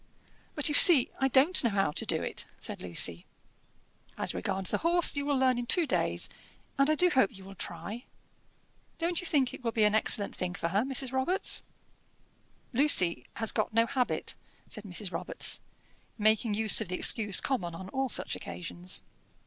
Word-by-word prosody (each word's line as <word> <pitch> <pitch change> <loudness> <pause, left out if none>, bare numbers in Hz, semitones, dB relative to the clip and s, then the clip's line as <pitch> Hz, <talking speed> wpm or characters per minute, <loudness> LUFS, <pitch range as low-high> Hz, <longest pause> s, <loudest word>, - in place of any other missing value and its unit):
"But 300 - +3
you 300 - +1
see 290 -4 +7
I 270 - +2
don't 275 +7 +4
know 235 - +2
how 195 -5 0
to - - -1
do - - 0
it," - - -4
said - - -8
Lucy. 85 -1 -1 0.9
"As - - -2
regards 190 - -3
the - - -1
horse, 340 0 +4
you 285 0 -3
will 285 -2 0
learn 255 -2 +1
in 240 - -6
two 345 +6 +4
days, - - -1 0.5
and 275 +2 +3
I 310 - +2
do 360 +3 +2
hope 260 -4 +2
you 190 - -13
will 195 +1 -12
try. 220 +5 -7 0.9
Don't 340 +1 +1
you 360 - -5
think 270 -6 0
it - - -11
will 230 - -2
be 220 -1 +1
an 210 0 +3
excellent 210 -1 +2
thing 180 -1 -5
for 170 - -3
her, 195 +4 0
Mrs. 265 0 -1
Robarts?" 265 +9 +1 1.1
"Lucy 235 - +4
has 225 -1 +1
got 215 0 -3
no 230 0 +3
habit," 250 +1 -2 0.4
said 215 -2 -6
Mrs. 190 0 -5
Robarts, - - -3 0.6
making 215 0 +1
use 220 -1 +5
of - - -4
the 180 - -4
excuse 205 -4 +2
common 180 -11 -3
on 185 +2 -9
all 265 +2 -3
such - - -1
occasions. 90 +1 -6
230 Hz, 185 wpm, -28 LUFS, 195-275 Hz, 1.1 s, see